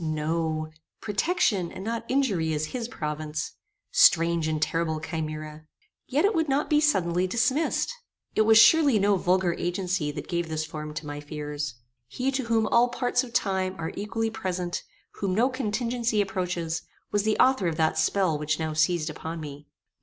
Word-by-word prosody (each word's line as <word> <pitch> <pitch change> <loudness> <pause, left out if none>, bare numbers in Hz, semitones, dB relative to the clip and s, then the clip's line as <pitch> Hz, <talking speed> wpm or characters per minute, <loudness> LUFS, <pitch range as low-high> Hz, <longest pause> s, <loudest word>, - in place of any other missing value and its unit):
No; 155 0 -1 0.3
protection, 210 - 0
and 185 - -8
not 230 +1 -3
injury 200 - +1
is 150 0 -1
his 240 -3 -3
province. 150 -5 -4 0.4
Strange 165 -1 +4
and 155 -1 -1
terrible 160 0 0
chimera! 155 -1 -5 0.4
Yet 290 +7 +2
it 415 - +3
would 320 -4 0
not 280 +3 0
be 300 0 +5
suddenly 185 - +2
dismissed. 260 - +1 0.4
It - - +2
was 220 0 +6
surely 285 0 +7
no 200 0 +3
vulgar 180 -1 +2
agency 180 -3 -1
that - - -6
gave 170 -2 -2
this 155 0 -2
form 150 -1 -7
to 155 0 -5
my 145 0 -5
fears. 145 -2 -5 0.3
He 255 - -2
to 265 -2 -2
whom 225 -1 +2
all 235 +3 +4
parts 245 +1 0
of 245 - -9
time 190 -3 0
are 160 - -4
equally 225 +2 -2
present, 185 -5 -3 0.4
whom 190 -2 0
no 240 +5 +3
contingency 235 -2 -1
approaches, 180 -4 -1 0.3
was 205 - +2
the 215 +1 +1
author 260 -8 +4
of 165 - -1
that 160 -1 +2
spell 185 -7 +1
which 150 0 -1
now 160 -1 -2
seized 160 0 +1
upon 160 +2 -6
me. 145 -1 -9
180 Hz, 170 wpm, -26 LUFS, 155-225 Hz, 0.4 s, surely